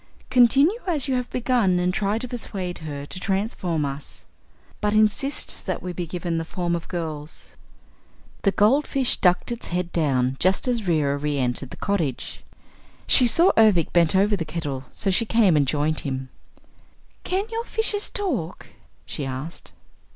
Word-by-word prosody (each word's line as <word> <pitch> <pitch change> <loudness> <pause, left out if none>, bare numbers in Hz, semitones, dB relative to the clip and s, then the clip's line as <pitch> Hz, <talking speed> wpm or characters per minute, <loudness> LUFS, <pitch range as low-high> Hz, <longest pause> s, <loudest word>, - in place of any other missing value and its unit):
Continue 275 - +5
as 300 -6 0
you 270 - 0
have 250 -1 -1
begun 235 -7 +1
and 180 +1 +1
try 205 +2 0
to 250 - -4
persuade 195 -7 -5
her 145 -3 -6
to 185 - -7
transform 185 -5 -1
us. 140 +1 -6 0.6
But 210 0 +1
insist 215 +7 +1
that - - -3
we 180 -1 -4
be 175 0 -4
given 170 -1 -3
the - - -2
forms 175 0 -2
of 170 - -6
girls." 160 -4 -6 0.9
The 195 - +3
goldfish 265 +5 +2
ducked 180 +5 +2
its 235 - -5
head 175 0 -2
down 135 -5 +1
just 185 +7 +2
as 235 -5 -1
Reera 145 -4 +1
re 145 0 -1
entered 125 0 -2
the - - -10
cottage. 165 -11 -2 0.6
She 250 - +6
saw 335 +10 +4
Ervic 210 -8 +4
bent 170 0 +3
over 205 +2 +3
the 175 - -3
kettle, 150 -5 -5
so 195 - 0
she 190 - +2
came 215 -7 +4
and 145 -2 +3
joined 150 +2 +1
him. 130 -2 -4 0.9
"Can 380 +2 -1
your 455 +1 -2
fishes 435 -3 0
talk?" 255 - -3 0.4
she 150 - -4
asked. 135 +6 -6
180 Hz, 165 wpm, -24 LUFS, 155-235 Hz, 0.9 s, She